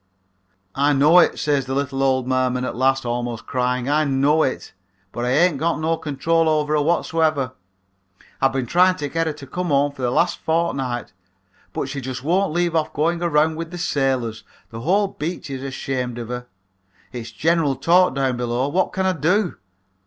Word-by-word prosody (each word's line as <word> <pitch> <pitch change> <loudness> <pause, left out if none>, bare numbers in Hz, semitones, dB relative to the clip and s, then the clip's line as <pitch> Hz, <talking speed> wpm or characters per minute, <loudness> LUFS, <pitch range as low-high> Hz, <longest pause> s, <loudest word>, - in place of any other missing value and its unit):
"'I 145 +2 +2
know 150 +6 +6
it,' - - +3
says 145 -3 0
the 130 - -2
little 135 -1 -2
old 130 -2 +1
merman 130 -1 0
at - - -4
last, 135 +1 +1
almost 120 -1 -3
crying; 125 0 -1
'I 150 +2 +2
know 140 +3 +2
it, 130 - -2 0.4
but 120 - -3
I - - 0
ain't 150 +2 +3
got 170 +2 0
no 160 +1 +1
control 160 +2 0
over 150 -1 +1
her 150 - +2
whatsoever. 155 -3 +1 0.9
I've 135 0 +4
been 135 -2 -2
trying 180 +7 +4
to 150 -5 -4
get 165 +1 -1
her 155 - -1
to 145 -2 -11
come 180 +7 -4
home 145 -1 +2
for 140 - -11
the 125 - +1
last 170 +8 +1
fortnight, 140 - -1 0.6
but - - -3
she 140 0 -5
just 130 0 -6
won't 180 +4 +1
leave 175 0 0
off 160 -1 0
going 165 +3 0
around 160 -1 +2
with 165 0 -5
the 175 - -7
sailors. 135 -9 -1 0.3
The 115 0 -7
whole 195 - +2
beach 165 -4 -5
is 135 -1 -5
ashamed 130 -2 -4
of 120 -1 -6
her. 125 0 -5 0.6
It's 120 -2 -7
general 150 +5 +1
talk 175 +4 +3
down 135 -2 0
below. 125 +2 -1
What 185 +6 0
can 190 0 -1
I 190 - +2
do? 180 +4 0
140 Hz, 190 wpm, -21 LUFS, 130-165 Hz, 0.9 s, know